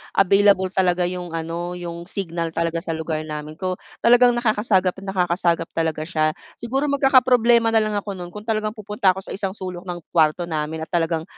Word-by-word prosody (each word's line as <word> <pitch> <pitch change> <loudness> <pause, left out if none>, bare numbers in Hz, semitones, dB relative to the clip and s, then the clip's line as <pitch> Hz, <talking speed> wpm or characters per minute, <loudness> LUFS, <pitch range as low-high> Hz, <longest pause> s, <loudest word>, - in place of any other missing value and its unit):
available 195 0 +4
talaga 180 -2 +2
yung 180 -1 -6
ano, 170 +2 -4
yung 170 -1 -7
signal 170 -4 -3
talaga 165 0 0
sa 170 - -4
lugar 160 -1 -3
namin 150 0 -6
ko 185 -1 -2 0.3
talagang 245 +1 +6
nakakasagap 210 -5 +2
nakakasagap 175 -3 0
talaga 160 -1 -1
siya. 155 -3 0 0.3
Siguro 270 +5 -2
magkakaproblema 255 -4 +4
na 225 - +4
lang 215 -1 -2
ako 205 -1 -3
no'n 175 -1 -8
kung 210 +2 -9
talagang 215 -1 0
pupunta 210 -3 +1
ako 190 +1 -7
sa - - -7
isang 195 -1 -2
sulok 185 -2 -6
ng 175 -1 -4
kuwarto 160 +1 +3
namin 160 0 -3
at - - -9
talagang 165 -2 0
180 Hz, 180 wpm, -22 LUFS, 165-210 Hz, 0.3 s, talagang